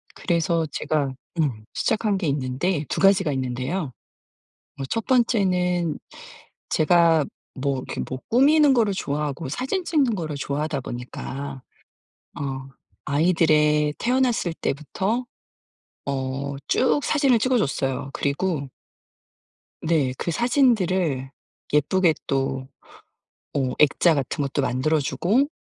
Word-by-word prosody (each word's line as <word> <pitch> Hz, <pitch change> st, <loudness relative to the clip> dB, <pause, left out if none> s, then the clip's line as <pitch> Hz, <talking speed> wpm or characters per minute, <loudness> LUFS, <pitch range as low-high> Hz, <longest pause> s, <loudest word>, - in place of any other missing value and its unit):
그래서 170 Hz, -2 st, 0 dB
제가 145 Hz, -4 st, -1 dB, 0.3 s
음 125 Hz, -9 st, -1 dB
시작한 215 Hz, -2 st, 0 dB
게 185 Hz, -4 st, -2 dB
있는데 145 Hz, +4 st, -1 dB
2 -, -, -2 dB
가지가 195 Hz, -4 st, +4 dB
있는데요. 130 Hz, +5 st, -2 dB, 0.9 s
어 -, -, -2 dB
1 225 Hz, -1 st, -1 dB
번째는 180 Hz, -, +2 dB, 0.7 s
제가 165 Hz, -1 st, +4 dB, 0.3 s
뭐 140 Hz, 0 st, -1 dB
이렇게 -, -, -4 dB
뭐 130 Hz, -, -4 dB
꾸미는 290 Hz, +4 st, +5 dB
거를 225 Hz, -5 st, +3 dB
좋아하고 150 Hz, -3 st, -3 dB
사진 265 Hz, -, -2 dB
찍는 285 Hz, -9 st, +2 dB
거를 155 Hz, -5 st, -4 dB
좋아하다 145 Hz, +1 st, -2 dB
보니까 130 Hz, +3 st, -6 dB, 0.8 s
어 135 Hz, -1 st, -4 dB, 0.4 s
아이들의 150 Hz, -1 st, +3 dB
태어났을 245 Hz, -7 st, +1 dB
때부터 190 Hz, -, -2 dB, 0.8 s
어 135 Hz, 0 st, -3 dB
쭉 260 Hz, +3 st, +2 dB
사진을 275 Hz, -6 st, +3 dB
찍어 255 Hz, +3 st, +2 dB
줬어요. 135 Hz, -4 st, -1 dB
그리고 145 Hz, 0 st, -1 dB, 1.1 s
네 155 Hz, -6 st, +1 dB
그 170 Hz, -, -2 dB
사진들을 190 Hz, -, +2 dB, 0.4 s
예쁘게 160 Hz, +4 st, +3 dB
또 135 Hz, -1 st, -1 dB, 0.9 s
어 130 Hz, -2 st, 0 dB
액자 150 Hz, +3 st, +5 dB
같은 140 Hz, 0 st, -2 dB
것도 140 Hz, +1 st, -1 dB
만들어주고 150 Hz, -, +1 dB
155 Hz, 235 characters per minute, -24 LUFS, 140-195 Hz, 1.1 s, 꾸미는